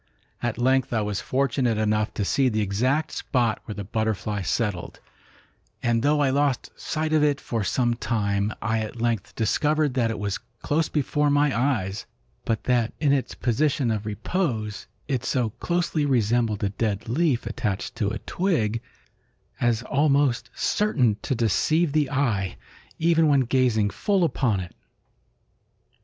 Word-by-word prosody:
At 120 -2 -2
length 130 +1 +2
I 110 - +2
was 105 -1 -2
fortunate 130 -3 0
enough 110 0 +1
to 100 - -1
see 135 +5 +2
the 110 -2 0
exact 130 +10 0
spot 120 -4 0
where 105 - -6
the 105 - -5
butterfly 105 0 -2
settled, 100 -2 -2 0.8
and 120 -1 +2
though 145 +3 +2
I 135 -2 +3
lost 140 -2 0
sight 155 0 -2
of 155 -1 +4
it 145 -1 +2
for 115 -6 -2
some 120 +4 +1
time, 105 -3 -1
I 115 -1 +1
at 110 +2 -5
length 115 -4 -1
discovered 150 +6 +1
that 120 -3 +1
it 115 - -3
was 100 -2 -2 0.2
close 155 +2 +1
before 150 0 +1
my 145 -1 +3
eyes, 115 -6 -1 0.4
but 110 -2 -1
that 120 -3 +1
in 145 -2 +3
its 135 -2 -1
position 130 0 +1
of 105 -1 -3
repose 110 - -2 0.2
it 130 -4 -1
so 120 -4 0
closely 170 - -1
resembled 115 -4 +1
a 100 - +2
dead 105 +1 -2
leaf 130 -1 +1
attached 115 -4 -3
to 105 -5 0
a 110 - -3
twig 115 - -1 0.8
as 120 -1 +1
almost 140 -2 +2
certain 130 - +1
to 135 - -1
deceive 145 - +2
the 150 -2 +1
eye, 115 -10 0 0.4
even 165 -1 +3
when 140 -2 +4
gazing 120 -5 +2
full 200 -3 +1
upon 120 - +1
it. 85 - -9
120 Hz, 155 wpm, -25 LUFS, 110-145 Hz, 0.8 s, of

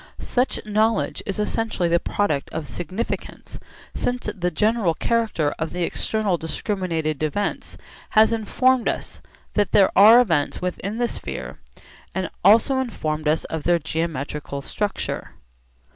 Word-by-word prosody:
Such 250 +1 -1
knowledge 215 +1 +1
is 195 - -2
essentially 210 -3 -1
the 170 0 +3
product 165 -7 -1
of 160 -2 -5
significance, 175 - -5 0.3
since 245 -1 -2
the 180 -2 0
general 210 0 +1
character 220 -11 0
of 160 0 -3
the 180 0 -1
external 205 +1 0
discriminated 165 -3 -2
events 155 +7 -2 0.4
has 220 +1 +6
informed 250 +3 +2
us - - -5 0.3
that 205 -2 +1
there 195 -2 +5
are 220 +4 +9
events 165 -12 +1
within 185 +4 -3
the 240 0 +1
sphere - - -6 0.6
and 190 -1 -1
has - - -8
also 230 +7 +5
informed 155 -11 -2
us 155 +1 +2
of 160 - -4
their 175 +3 +3
geometrical 150 -3 -4
structure. 205 +5 -3
190 Hz, 135 wpm, -23 LUFS, 160-220 Hz, 0.6 s, are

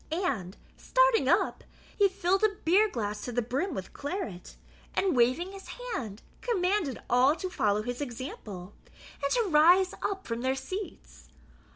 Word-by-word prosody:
And, 260 - -2 0.2
starting - - +3
up, - - +2 0.3
he 405 -1 +4
filled 380 +2 0
a 425 -2 +3
beer 400 +6 +5
glass 210 - -3
to 245 - -4
the 245 0 0
brim 275 - -2
with 190 - -6
claret, 285 - -5 0.4
and 380 -6 +2
waving 255 +10 +2
his 390 -1 -10 0.3
hand, 220 - -5 0.2
commanded 375 - 0
all 255 +5 +4
to 370 +1 -5
follow 210 - +1
his 245 +4 -4
example, 220 -8 -7 0.5
and 280 - 0
to 480 - +3
rise 350 +4 +5
up 390 -1 -2
from 230 0 -3
their 260 +1 +1
seats. 265 - -7
285 Hz, 155 wpm, -29 LUFS, 230-380 Hz, 0.5 s, beer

